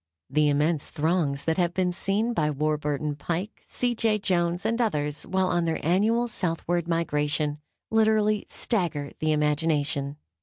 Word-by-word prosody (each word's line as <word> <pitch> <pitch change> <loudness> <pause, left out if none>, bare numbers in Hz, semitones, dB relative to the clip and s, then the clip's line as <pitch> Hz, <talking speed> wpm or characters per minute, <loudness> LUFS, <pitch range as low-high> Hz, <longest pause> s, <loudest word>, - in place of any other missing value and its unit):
The 150 +1 +3
immense 150 +2 +1
throngs 155 -3 0
that 160 0 +1
have 175 -1 +1
been 185 -1 +1
seen 200 +6 0
by 155 -8 +1
Warburton 150 0 -1
Pike, 175 +7 -4
C. 245 -1 0
J. 220 -2 +1
Jones 175 -2 0
and 230 +2 +1
others, 150 -9 -1
while 190 0 +1
on 175 -1 +1
their 165 -1 0
annual 220 +8 +2
southward 175 -4 -1
migration, 150 -2 0 0.3
literally 215 -1 +2
stagger 165 - -1
the 155 0 +1
imagination. 150 -1 0
165 Hz, 145 wpm, -26 LUFS, 150-195 Hz, 0.3 s, The